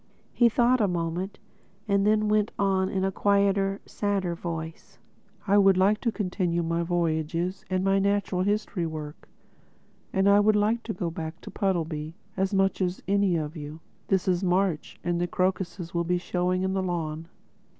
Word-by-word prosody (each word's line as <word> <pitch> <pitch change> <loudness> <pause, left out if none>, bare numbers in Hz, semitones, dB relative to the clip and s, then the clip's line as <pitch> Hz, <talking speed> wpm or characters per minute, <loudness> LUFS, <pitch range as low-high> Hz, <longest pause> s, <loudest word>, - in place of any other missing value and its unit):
He 240 -1 +5
thought 240 +2 +3
a 205 - +3
moment—then 195 +4 -1
went 210 0 +2
on 190 -1 +1
in 190 -1 -1
a 195 - 0
quieter, 200 0 +2
sadder 200 -4 -1
voice: 165 -1 -6 0.5
"I 205 0 +4
would 195 -2 +5
like 200 +3 +3
to 235 - +1
continue 180 -4 -1
my 165 +1 0
voyages 170 +1 -1
and 185 0 0
my 195 0 +3
natural 200 -2 +1
history 205 -3 -1
work; 155 -1 -8 0.8
and 190 0 +2
I 200 0 +6
would 210 +1 +4
like 215 +3 +2
to 220 - -3
go 175 -1 -3
back 160 0 -6
to - - -9
Puddleby—as 170 0 -2
much 195 0 +1
as 180 0 -1
any 200 -2 +2
of 155 0 -3
you. 150 0 -7 0.3
This 190 -1 +1
is 180 0 +1
March, 180 -3 0
and 175 0 0
the 175 - 0
crocuses 185 -1 -2
will 170 0 +1
be 180 +1 +1
showing 180 +1 -1
in 190 0 0
the 190 - 0
lawn.... 165 -3 -3
185 Hz, 165 wpm, -27 LUFS, 170-200 Hz, 0.8 s, I